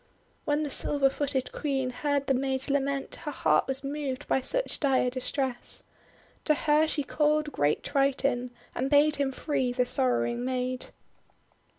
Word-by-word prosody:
When 295 +1 +1
the 295 - -3
silver 275 -1 +3
footed 270 -2 -2
Queen 270 -3 -2
heard 285 +2 -1
the 270 - +2
maid's 265 +1 0
lament, 275 0 -1
her 320 - -6
heart - - +2
was 265 +1 0
moved 280 -1 -4
by 265 - +1
such - - 0
dire 265 -3 +2
distress. 255 -1 -1 0.6
To 305 - +3
her 300 +1 +3
she 300 -2 0
called 300 +2 +1
great 145 - 0
Triton, 275 -3 0 0.2
and 265 +2 -2
bade 295 +1 +4
him 280 -1 0
free 265 -2 -1
the 250 0 +1
sorrowing 120 - +1
maid. 255 0 -2
275 Hz, 155 wpm, -28 LUFS, 255-290 Hz, 0.6 s, bade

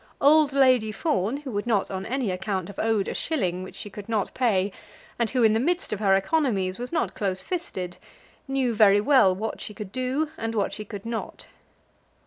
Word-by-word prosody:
Old 300 0 +5
Lady 255 -5 +4
Fawn, 215 - 0
who 285 -3 -7
would 205 +2 -3
not 210 -5 +1
on 190 0 -4
any 255 -4 -1
account 185 0 -3
have 200 - -9
owed 220 -3 +1
a - - -2
shilling 185 - -1
which 185 - -9
she - - -7
could 205 +2 -9
not 215 -4 -1
pay, 205 -6 +1 0.5
and 235 -2 +1
who, 255 -2 +1
in 220 -1 +5
the 220 - +2
midst 345 - 0
of 205 - -3
her 195 -2 +4
economies, 195 - 0
was 245 +1 -5
not 335 - 0
close 190 -2 -2
fisted, 185 - -4 0.5
knew 270 -3 0
very 205 -2 +6
well 230 -6 +5
what 220 +4 -4
she 210 - -6
could 210 -4 -7
do 260 +5 -1
and 225 0 -3
what 205 - 0
she 215 - -5
could 205 0 -8
not. 230 -1 -5
220 Hz, 205 wpm, -25 LUFS, 195-260 Hz, 0.5 s, very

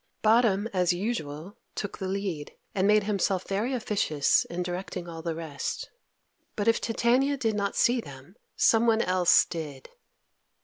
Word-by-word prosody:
Bottom, 220 -2 +4
as 180 -1 +2
usual, 175 -3 -4 0.2
took 205 - -5
the 190 - -3
lead, 185 -6 -3 0.2
and 195 0 +1
made 210 0 +4
himself 195 -2 0
very 210 +6 -1
officious 205 - +1
in 175 +1 -4
directing 180 0 -5
all 165 -1 -7
the 165 0 -3
rest. 160 -4 -5 0.6
But 205 - -2
if 230 - +3
Titania 250 +5 +2
did 225 -4 0
not 200 -1 -2
see 240 0 +3
them, 140 +2 -13 0.2
someone 225 0 +4
else 180 -1 +4
did. 155 -6 -7
195 Hz, 145 wpm, -27 LUFS, 170-220 Hz, 0.6 s, Bottom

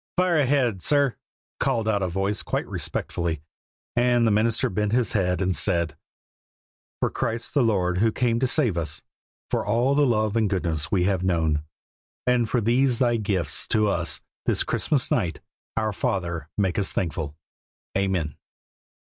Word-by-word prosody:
"Fire 180 -3 +3
ahead, 130 -8 +2
sir," 140 0 +2 0.4
called 115 -1 0
out 105 -2 +1
a 95 - 0
voice 95 +3 -1
quite - - -2
respectfully, 80 -4 -2 0.5
and 120 0 +3
the 110 - +3
minister 110 +2 +2
bent 105 +3 -1
his 125 -1 +2
head 90 -2 +1
and 95 -1 +1
said: 85 -3 +1 1.0
"For - - 0
Christ 115 0 -3
the 145 - +3
Lord 90 -6 +1
who 110 +2 +3
came 115 0 +1
to 130 - +2
save 120 - +2
us, 80 -6 -4 0.5
for - - +1
all 120 +6 +2
the 145 0 +3
love 110 -3 +1
and 110 -3 +2
goodness 85 -6 -1
we 95 -3 +2
have 95 -1 +1
known, 80 -5 +1 0.6
and 125 -2 +2
for 120 - +1
these 120 +3 +3
Thy 120 -1 +2
gifts 95 -8 0
to 105 -1 +2
us 85 -3 0 0.3
this - - +3
Christmas 140 -5 +1
night, 85 -4 0 0.4
our 110 -1 0
Father, 85 -6 -2
make 95 -3 +1
us 100 - 0
thankful. 80 -4 -3 0.6
Amen." 95 -6 -1
105 Hz, 160 wpm, -25 LUFS, 90-120 Hz, 1.0 s, Fire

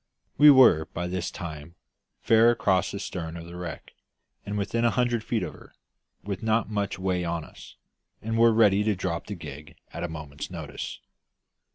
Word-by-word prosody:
We 150 +1 +9
were 125 - +7
by 90 - -2
this 90 0 -3
time 80 -2 -8 0.5
fair 115 +1 +5
across 95 -6 +2
the 100 - -5
stern 85 -4 -5
of 85 - -8
the 85 +1 -10
wreck, 90 -2 -7 0.5
and 105 +1 -3
within 115 +3 -1
a 120 - +5
hundred 120 -2 0
feet 110 -3 -1
of - - -5
her, - - -17 0.5
with 100 -2 -4
not 110 -1 0
much 100 -2 -2
way 95 -1 -1
on 85 -1 -2
us, - - -14 0.4
and 115 +1 -3
were 115 0 +5
ready 105 -3 +4
to 105 -1 +1
drop 85 -2 -3
the 105 - -5
gig 75 -3 -10 0.2
at - - -5
a - - -1
moment's 75 -3 -7
notice. - - -7
95 Hz, 185 wpm, -26 LUFS, 85-110 Hz, 0.5 s, We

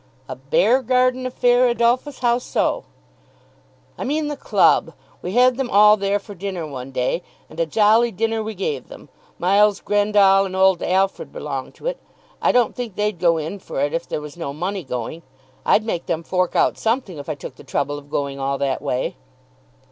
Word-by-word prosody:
"A - - -6
bear 475 - +2
garden 255 +1 +1
affair, 250 0 +3
Adolphus. 240 +4 0
How 240 -1 +2
so?" - - -1 1.1
"I - - -3
mean 295 +2 -1
the 295 - -3
club. - - +2 0.3
We 180 - -5
had 250 +1 +4
them 265 -2 -2
all 210 0 +7
there 200 0 0
for 205 0 -10
dinner 190 -3 -5
one 135 -3 -7
day, 130 +6 -1 0.3
and 155 - -12
a 165 - +1
jolly 220 +6 +4
dinner 225 +2 -1
we 220 0 -5
gave 150 -9 -3
them. - - -13 0.3
Miles 200 +3 +3
Grendall 205 -1 +3
and 185 - -7
old 190 -1 +4
Alfred 190 +1 0
belong 135 -3 -5
to - - -15
it. - - -2 0.4
I - - +4
don't 245 -2 +2
think 240 -6 -5
they'd 210 -3 -1
go 170 -2 +3
in 160 +6 -4
for 185 - -6
it, 145 +2 0
if 165 +1 -2
there - - -3
was 150 -1 -9
no 165 -5 -5
money 185 +5 -3
going. 125 +4 -5 0.5
I'd 215 - +4
make 175 -6 -3
them 165 0 -2
fork 185 +1 -1
out - - +2
something 220 - -1
if 145 - -8
I 155 - -2
took 135 -2 -9
the - - -13
trouble 145 +1 -2
of 145 0 -18
going 140 -1 -3
all 135 0 -1
that 135 -1 -1
way." 125 - -2
195 Hz, 195 wpm, -21 LUFS, 155-235 Hz, 1.1 s, all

